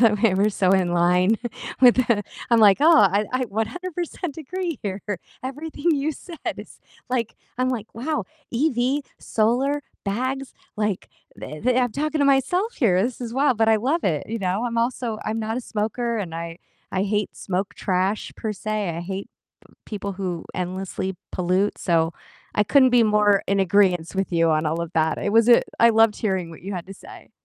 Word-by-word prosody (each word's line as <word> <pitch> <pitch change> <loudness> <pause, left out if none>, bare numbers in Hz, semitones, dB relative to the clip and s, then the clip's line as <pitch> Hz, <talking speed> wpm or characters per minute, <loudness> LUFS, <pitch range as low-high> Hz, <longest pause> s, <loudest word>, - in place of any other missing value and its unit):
the 220 -3 +5
way 220 -5 +4
we're 200 +3 +3
so 190 -2 +1
in 185 -2 +2
line 180 +5 +3 0.4
with 250 -2 +8
the 235 -5 +2 0.3
I'm 235 - +5
like, 200 -3 +7
"Oh 325 +2 +7
I 200 +1 +4
I 255 - +1
100% 340 - -4
agree 335 +1 -4
here 200 -1 -3 0.4
everything 295 +4 -2
you 290 +2 -1
said 335 +2 -11 0.2
is - - -11 0.3
like" 240 -3 -1 0.2
I'm 255 0 +2
like, 225 -4 -3
"Wow, 295 +7 -2 0.3
EV, 260 +1 +1 0.2
solar, 250 +6 +1 0.2
bags," 255 +6 -2 0.2
like, 210 -3 -1 0.3
the 155 - -8
the 250 +1 +2
I'm 245 -3 +1
talking 305 +3 -1
to 285 - +3
myself 280 - +2
here, 190 - +3
this 245 +3 -3
is 235 -2 -5
wild, 265 -2 +2
but 225 0 +3
I 220 - +5
love 275 +10 0
it, 155 -6 -1
you 230 +1 -3
know, 195 +3 -1
I'm 235 -1 -3
also 235 -1 -1
I'm 220 +1 -2
not 225 +1 -2
a - - -1
smoker 230 +1 -2
and 175 -6 -4
I 165 0 -6 0.3
I 185 - +1
hate 210 0 -1
smoke 190 +1 -3
trash 190 +2 -1
per 220 -2 -3
se, 210 -1 -2
I 165 0 -4
hate 190 +3 -5 0.6
people 200 -2 -5
who 180 -3 -4
endlessly 185 +1 -3 0.2
pollute, 185 +3 0
so 165 -2 +1 0.4
I 210 - +3
couldn't 260 +3 +5
be 245 -1 +5
more 210 -2 +4
in 200 0 +2
agreeance 185 -3 +2
with 195 0 -2
you 165 -1 +3
on 155 0 +1
all 160 +2 0
of 170 -1 -5
that, 160 -1 +1
it 205 - -1
was 225 +1 +4
a 240 - +7 0.2
I 235 - +7
loved 225 -1 +4
hearing 190 -5 -1
what 165 - -12
you 200 +2 -5
had 175 -2 -5
to 195 - -8
say. - - -14
215 Hz, 190 wpm, -23 LUFS, 190-255 Hz, 0.6 s, with